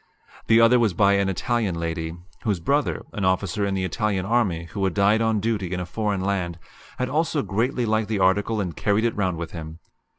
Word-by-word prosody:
The 115 0 +6
other 115 +2 +6
was 110 -7 +1
by 100 -1 +4
an 100 -1 +2
Italian 105 0 -1
lady, 80 0 -3 0.2
whose 105 -5 -1
brother, 140 - 0
an 105 - -3
officer 95 +2 0
in 100 - -1
the 95 - -1
Italian 95 0 -1
army 100 -7 +1
who 100 - -3
had 95 -2 0
died 105 +2 +3
on 110 -1 +2
duty 100 -4 -1
in 90 - -2
a 90 - -3
foreign 105 0 -2
land, 95 -3 -1 0.4
had 125 - -1
also 150 +1 0
greatly 120 +4 0
liked 110 -1 0
the 110 - 0
article 100 +4 +2
and 90 -5 -3
carried 105 +2 +1
it 115 - 0
round 95 -4 0
with 85 0 -5
him. 80 -1 -8
100 Hz, 210 wpm, -24 LUFS, 95-110 Hz, 0.4 s, The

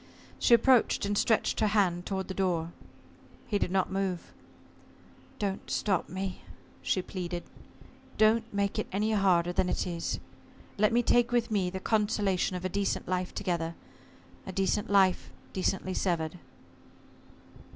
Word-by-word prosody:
She 235 - +6
approached, 235 -2 +3
and 205 0 0
stretched 220 +2 +2
her 215 - +3
hand 185 -4 +1
toward 190 -1 -2
the 190 - -4
door. 175 -4 0 0.7
He 205 -3 -1
did - - 0
not 190 0 0
move. 190 -2 -2 1.0
"Don't 200 -2 -3
stop 195 -4 0
me," 185 +1 -4 0.4
she 185 - 0
pleaded. 175 -2 -5 0.7
"Don't 225 +1 +3
make 200 -1 -1
it - - -2
any 210 +3 0
harder 180 -4 +3
than 180 - +1
it - - -1
is. 170 -2 -3 0.6
Let 210 0 +3
me 240 +1 +3
take 240 +1 +3
with 240 -2 +1
me 195 -4 +1
the 190 +1 -5
consolation 205 -3 +1
of 180 0 -5
a - - +3
decent 200 +2 -1
life 185 0 -2
together 165 -2 -2 0.7
a - - -4
decent 195 +2 0
life 195 -2 +3 0.2
decently 190 0 -1
severed." 170 -2 -1
190 Hz, 145 wpm, -29 LUFS, 180-210 Hz, 1.0 s, She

